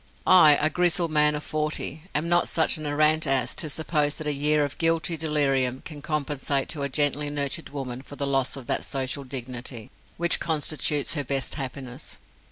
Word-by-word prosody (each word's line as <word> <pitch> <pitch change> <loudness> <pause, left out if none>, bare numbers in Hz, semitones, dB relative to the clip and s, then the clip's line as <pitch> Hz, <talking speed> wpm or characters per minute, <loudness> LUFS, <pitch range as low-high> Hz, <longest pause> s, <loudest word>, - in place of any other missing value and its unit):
I, 155 -5 +7
a 155 +1 +1
grizzled 175 -2 +2
man 150 -1 +4
of 150 - -5
forty, 155 0 -2
am 150 +3 0
not 175 0 +2
such 160 -1 +1
an 155 - -3
arrant 155 +1 +2
ass 130 -3 +2
as - - -5
to 155 - +1
suppose 150 -1 0
that 155 - -6
a 150 - +1
year 150 +1 +1
of 140 - -8
guilty 165 0 +1
delirium 135 -5 0
can 150 -2 -8
compensate 145 -2 -2
to 150 - -2
a 140 - -2
gently 145 +1 +1
nurtured 145 +2 -2
woman 130 -3 -6
for 145 - -11
the 140 - -3
loss 135 -2 0
of 135 -3 -9
that - - 0
social 135 0 -3
dignity 125 -3 -5 0.3
which 170 0 +4
constitutes 150 -2 +1
her 145 -3 -1
best 135 0 0
happiness. 130 -2 -6
145 Hz, 190 wpm, -24 LUFS, 135-155 Hz, 0.3 s, I